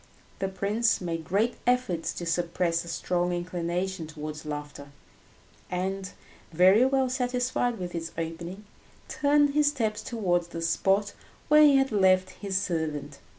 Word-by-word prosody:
The 195 - 0
prince 205 +4 +1
made 165 -2 -4
great 205 +8 0
efforts 245 -10 +1
to 175 - -6
suppress 170 0 0
a - - -12
strong 175 +1 -1
inclination 175 0 -3
towards 150 0 -7
laughter, 145 -1 -6 0.8
and, 190 +1 -3 0.4
very 185 +7 +5
well 265 -1 +2
satisfied 250 -1 -1
with 180 -2 -5
this 165 -1 -5
opening, 170 +5 -5 0.4
turned 290 0 +3
his 295 0 +3
steps 225 -7 0
towards 180 -8 -1
the 165 -1 -7
spot 195 +4 +1 0.4
where 300 +1 +7
he 295 -2 +7
had 270 -1 +2
left 185 -2 +3
his 195 -1 -3
servant. 155 -6 -3
185 Hz, 140 wpm, -27 LUFS, 170-225 Hz, 0.8 s, where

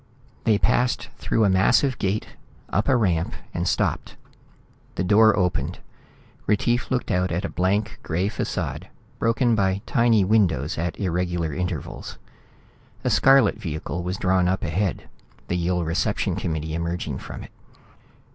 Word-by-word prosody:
They 110 -3 +4
passed 125 +4 +1
through 110 - +1
a - - +3
massive 105 +8 +3
gate, 100 +2 -1 0.4
up 105 - +1
a 135 - +5
ramp, 90 -8 +1 0.2
and 85 +1 -2
stopped. - - -1 0.8
The 90 - -1
door 110 +3 +5
opened. 90 -3 0 0.7
Retief 120 +4 +1
looked 130 -2 -1
out 90 -1 +1
at 85 +3 -1
a - - -3
blank 100 +4 -1
gray 90 +4 -1
facade, 105 - -3 0.3
broken 115 +1 +2
by 100 -1 +1
tiny 115 -4 +3
windows 95 - +2
at 85 0 -3
irregular 90 -4 -1
intervals. 90 -3 -4 0.9
A - - +1
scarlet 135 -5 +5
vehicle 80 0 -4
was 90 +2 -3
drawn 95 -1 +2
up 95 +1 0
ahead, 90 +4 -1 0.4
the 90 - 0
Yill 90 0 0
reception 80 +2 0
committee 80 -1 -3
emerging 85 -4 -3
from - - -8
it. - - -12
95 Hz, 140 wpm, -24 LUFS, 85-110 Hz, 0.9 s, a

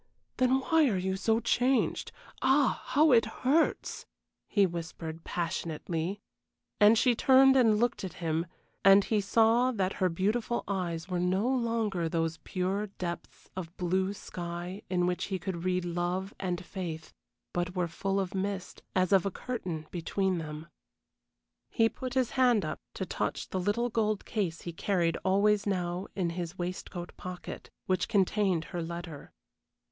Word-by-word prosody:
Then 255 +1 +3
why 320 +1 +4
are 200 - 0
you 190 +1 -1
so 220 +4 +2
changed? 250 +2 +1 0.3
Ah, 265 0 +3
how 300 +4 +4
it 230 -2 +6 0.2
hurts!" 300 +6 +1 0.4
he 205 -3 +4
whispered, 165 -2 -5
passionately. 170 +2 -3 0.6
And 210 +2 +7
she 250 +1 +4
turned 265 +2 +6
and 225 -5 +5
looked 240 -1 0
at 185 -4 -5
him, 165 0 -2 0.4
and 195 +1 +8
he 215 0 +1
saw 230 +5 +4
that 195 -5 -1
her 185 - +4
beautiful 215 +7 0
eyes 175 -4 -2
were 180 -2 -1
no 185 +5 +1
longer 230 -9 0
those 165 -1 -1
pure 195 +3 -1
depths 175 -3 -7
of 175 -1 -7
blue 185 +2 +1
sky 175 0 -6
in 180 -1 +1
which 180 0 -1
he 195 - -2
could 180 -1 -5
read 180 -1 +1
love 175 +3 -2
and 180 -1 -3
faith, 165 -5 -6 0.4
but 175 +1 -2
were 180 -1 +1
full 195 +4 -1
of 190 0 -2
mist, 195 -1 -3
as 185 -1 +2
of 190 -2 +5
a 200 - 0
curtain 180 -8 -5
between 185 +1 -1
them. 155 0 -6 1.0
He 225 -1 +3
put 255 +1 -6
his 255 -3 +2
hand 245 -5 +3
up - - -4 0.2
to - - -3
touch - - -3
the 190 - -2
little 205 +6 0
gold 215 -2 0
case 185 -7 -2
he 170 - -6
carried 170 -1 0
always 205 +2 +3
now 180 -1 -1
in 175 -4 0
his 175 +1 -5
waistcoat 175 0 -5
pocket, 180 0 -7 0.2
which 185 -2 +1
contained 195 -4 +2
her 175 - -2
letter. 170 -2 -7
190 Hz, 155 wpm, -30 LUFS, 175-220 Hz, 1.0 s, and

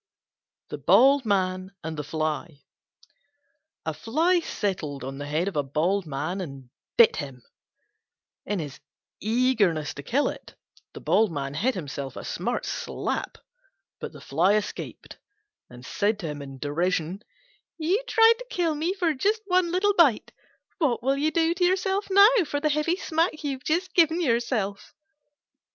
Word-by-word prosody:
THE 150 - -6
BALD 255 - +5
MAN 185 -2 0
AND 160 0 -4
THE 150 - -4
FLY 155 0 -3 1.2
A 160 - -1
Fly 320 - +1
settled 170 - -3
on 135 +1 -6
the 145 - -5
head 155 +5 0
of 200 - -3
a 145 - +2
Bald 160 +7 0
Man 155 +7 -3
and 135 -7 -9 0.3
bit 235 - +6
him. 135 -5 -6 1.0
In 205 - -2
his 145 -5 -6 0.4
eagerness 215 - +1
to - - -8
kill 260 - +1
it, - - -7 0.4
he 145 -10 0
hit 245 - +1
himself 140 -5 -5
a - - -7
smart - - -2
slap. - - -3 0.6
But - - -6
the - - -13
Fly 200 +3 +2
escaped, 210 -1 -5 0.5
and 125 0 -12
said 210 - 0
to - - -5
him 145 -1 -6
in 135 -1 -9
derision, 170 +5 -1 0.6
"You 350 +8 +1
tried 455 0 +5
to - - -9
kill 340 -6 0
me 325 +6 -1
for 350 -5 +1
just 420 +10 0
one 365 -3 +2
little 400 +3 +2
bite; 300 - +3 0.5
what 260 -8 +1
will 270 +2 +2
you 295 +3 +1
do 325 +1 +2
to 355 +1 -1
yourself 385 +2 +1
now, 400 +3 +6
for 290 - -2
the 305 +1 +1
heavy 305 +3 +1
smack 325 -3 -1
you 290 - -1
have 260 -1 -6
just 345 +6 -1
given 330 -1 +4
yourself?" 235 - -1
220 Hz, 155 wpm, -26 LUFS, -, 1.2 s, bit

